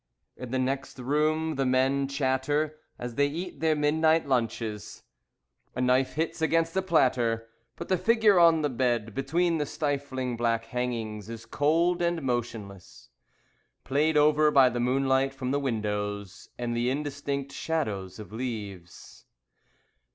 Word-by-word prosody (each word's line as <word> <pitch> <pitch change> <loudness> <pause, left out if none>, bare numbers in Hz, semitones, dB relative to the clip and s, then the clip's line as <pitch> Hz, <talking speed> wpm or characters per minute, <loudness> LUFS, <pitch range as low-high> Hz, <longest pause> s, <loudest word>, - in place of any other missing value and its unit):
In 125 - -8
the 130 - -1
next 135 +2 -2
room, 155 +4 0
the 135 - +1
men 135 +2 +2
chatter 140 +3 -1 0.2
As 120 0 -6
they 145 +4 +2
eat 170 +5 -6
their 160 -1 +2
midnight 155 +1 +2
lunches. 115 -4 -2 0.7
A - - -4
knife 125 +1 +2
hits 160 +1 -2
against 165 +1 +1
a 190 - +2
platter. 125 -10 +1 0.3
But - - -7
the 185 -2 +1
figure 220 -4 +4
on 165 -2 +5
the 145 - +1
bed 120 -3 0
Between 165 - 0
the 150 - -1
stifling 135 -4 -2
black 115 -1 0
hangings 115 -3 -4
Is 115 0 -8
cold 170 +5 +1
and 170 -2 0
motionless, 115 -7 -5 0.7
Played 150 +3 +1
over 150 +1 +5
by 135 -3 +6
the 120 0 -3
moonlight 135 +2 +1
from 130 -1 -3
the 140 - +1
windows 105 -6 -3
And 120 -1 -2
the 120 +1 +1
indistinct 140 0 -3
shadows 105 - -3
of 105 -2 -10
leaves. 105 -7 -7
135 Hz, 145 wpm, -27 LUFS, 120-155 Hz, 0.7 s, by